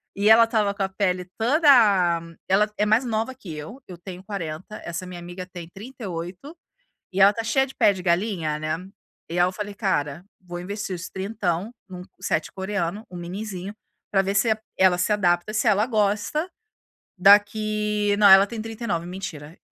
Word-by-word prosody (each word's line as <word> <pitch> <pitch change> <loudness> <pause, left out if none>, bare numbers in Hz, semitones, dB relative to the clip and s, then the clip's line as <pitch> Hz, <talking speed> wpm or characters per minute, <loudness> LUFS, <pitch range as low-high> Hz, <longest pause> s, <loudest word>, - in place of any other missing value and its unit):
E 205 +2 +2
ela 225 +1 +8
estava 220 -3 +1
com 200 - -2
a 190 - -1
pele 185 -2 -1
toda 290 +8 +2 0.8
ela 205 +3 +3
é 210 - +2
mais 220 +4 +3
nova 230 +1 -2
que 210 -9 -11
eu, 155 - -8
eu 180 - -10
tenho 180 +1 -10
40, 190 0 -6
essa 175 +2 -5
minha 180 -1 -8
amiga 175 +1 -8
tem 175 -2 -8
38, 195 - -8 0.6
e 190 - -2
ela 195 +1 +8
está 225 +2 -4
cheia 265 +4 +2
de 265 - -13
pé 205 - +5
de 185 -2 -7
galinha, 170 -4 0
né. 155 +1 -2 0.5
E 170 +2 -3
aí 175 - +5
eu 185 - -2
falei: 205 +1 -6
"Cara, 170 -5 -1 0.2
vou 175 -2 -8
investir 200 +2 -5
os 175 +1 -7
trintão 190 0 -3 0.2
num 180 -1 -8 0.2
set 155 - -1
coreano, 195 +1 -3
um 180 - -9
minizinho, 190 +2 -6 0.4
para 195 - +3
ver 195 +1 -2
se 200 +3 +3
e 220 - +1 0.2
ela 185 -1 +4
se 180 +4 +1
adapta, 180 0 +1
se 220 +1 +2
ela 210 +1 +3
gosta, 215 - 0 0.7
daqui" 210 +1 +3
não 205 -1 +6
ela 195 +1 +8
tem 225 0 -6
39, 220 -6 -4
mentira. 170 -4 -8
195 Hz, 185 wpm, -24 LUFS, 180-215 Hz, 0.8 s, ela